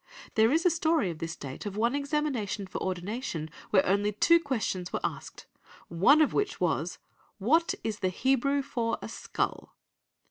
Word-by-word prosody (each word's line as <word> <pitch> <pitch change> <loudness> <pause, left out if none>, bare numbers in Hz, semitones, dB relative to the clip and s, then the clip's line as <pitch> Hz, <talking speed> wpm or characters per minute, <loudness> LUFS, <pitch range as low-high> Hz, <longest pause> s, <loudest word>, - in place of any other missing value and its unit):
There 220 +2 +4
is 325 +4 +2
a 360 - +6
story 320 - +1
of 160 - -9
this 165 -1 -4
date 135 +8 -7
of 200 0 -6
one 235 +3 +2
examination 280 -8 -1
for 190 - -6
ordination 180 -3 -3 0.2
where 190 -2 +4
only 200 +2 +2
two 335 +11 +5
questions 220 - -2
were - - -1
asked, - - -5 0.4
one 195 - +5
of 295 - 0
which 410 -1 -1
was, - - 0 0.4
"What 310 - +2
is 215 -2 -3
the 185 - +1
Hebrew 270 +7 +1
for 235 -4 -2
a - - -4
skull?" - - -4
225 Hz, 170 wpm, -29 LUFS, 190-285 Hz, 0.4 s, a